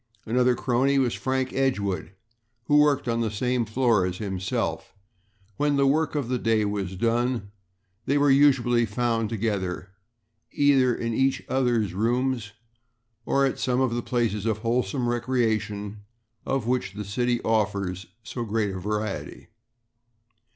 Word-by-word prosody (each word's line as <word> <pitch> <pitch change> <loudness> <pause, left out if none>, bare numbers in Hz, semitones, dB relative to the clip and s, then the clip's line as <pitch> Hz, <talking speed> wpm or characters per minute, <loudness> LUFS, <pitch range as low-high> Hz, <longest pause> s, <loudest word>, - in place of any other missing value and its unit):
Another 125 +2 +2
crony 130 +3 +1
was 130 -3 +2
Frank 130 0 -2
Edgewood, 100 -9 -1 0.5
who 145 +5 +4
worked 150 -3 +3
on 115 0 0
the 115 - 0
same 125 +3 -1
floor 115 -2 +2
as 90 0 -2
himself. 95 -3 -3 0.6
When 145 0 +1
the 140 0 +3
work 155 +3 +1
of 140 -5 -1
the 125 0 -1
day 110 -2 +2
was 100 -2 -3
done 115 0 0 0.6
they 140 - +2
were 145 -1 +4
usually 125 -4 +4
found 115 0 0
together, 100 -4 -2 0.6
either 135 -4 +3
in 115 -1 -3
each 135 +3 +1
other's 120 -7 +1
rooms 120 +2 0 0.8
or 140 0 +3
at 135 - -2
some 125 0 0
of 130 -3 +1
the 120 - -1
places 115 -4 -1
of 110 -2 +1
wholesome 120 +1 0
recreation 110 -4 -1 0.5
of 135 -4 -1
which 125 -5 -1
the 105 0 -6
city 120 +4 0
offers 100 -4 -1 0.2
so 120 +3 -5
great 110 -2 -1
a 95 - -5
variety. 105 +2 -4
115 Hz, 145 wpm, -25 LUFS, 105-130 Hz, 0.8 s, who